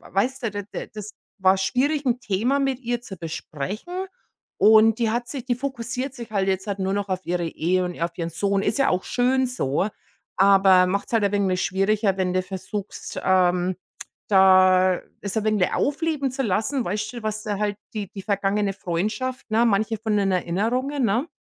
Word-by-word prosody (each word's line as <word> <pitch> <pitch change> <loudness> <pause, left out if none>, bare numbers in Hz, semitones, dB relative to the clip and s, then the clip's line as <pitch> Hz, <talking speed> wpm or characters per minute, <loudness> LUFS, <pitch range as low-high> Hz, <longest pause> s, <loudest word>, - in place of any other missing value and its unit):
weißt 255 +6 0
du? 225 - 0
D 205 0 -4
d - - -5
das 210 0 -7 0.3
war 190 0 +4
schwierig, 275 +9 0
'n 245 0 +1
Thema 235 +8 +1
mit 270 -2 0
ihr 240 -1 -2
zu 195 -5 -8
besprechen. 185 - -5 0.5
Und 220 +1 +6
die 225 -2 +2
hat 240 +1 -1
sich 260 -2 -5
die 245 - 0
fokussiert 255 0 -4
sich 235 -3 -9
halt 195 -2 +1
jetzt 190 +1 -1
nur 190 0 -1
noch 200 0 -2
auf 185 0 -3
ihre 175 0 -1
Ehe 180 +3 0
und 180 -1 -5
auf 170 0 -1
ihren 165 -1 -2
Sohn. 200 +3 0
Ist 220 - +1
ja 275 - +3
auch 180 +1 0
schön 255 +1 +1
so, 190 - -1 0.5
aber 195 -1 +6
macht 200 +2 -2
es - - -11
halt 220 -3 +3
ein 200 - +1
wenig 190 -2 +1
schwieriger, 195 +1 +1
wenn 180 -1 0
du 185 - +3
versuchst, 195 +2 -6
ähm, 180 -1 +2 0.5
da 185 -2 +5 0.2
es 200 +2 -3
ein 220 - +1
wenig 215 -4 +1
aufleben 295 -2 0
zu 270 - -2
lassen, 225 +6 0
weißt 210 +3 -2
schon, 240 -2 -8
was 215 0 -2
da 205 -2 -2
halt 205 -1 -1 0.2
die 205 -3 -4
die 195 - -7
vergangene 200 0 0
Freundschaft 215 +9 -3
ne, 225 +2 +3
manche 220 0 +1
von 220 -2 -1
den 200 -1 +2
Erinnerungen, 240 +11 0
ne? 235 +9 +1
205 Hz, 195 wpm, -23 LUFS, 190-240 Hz, 0.5 s, Und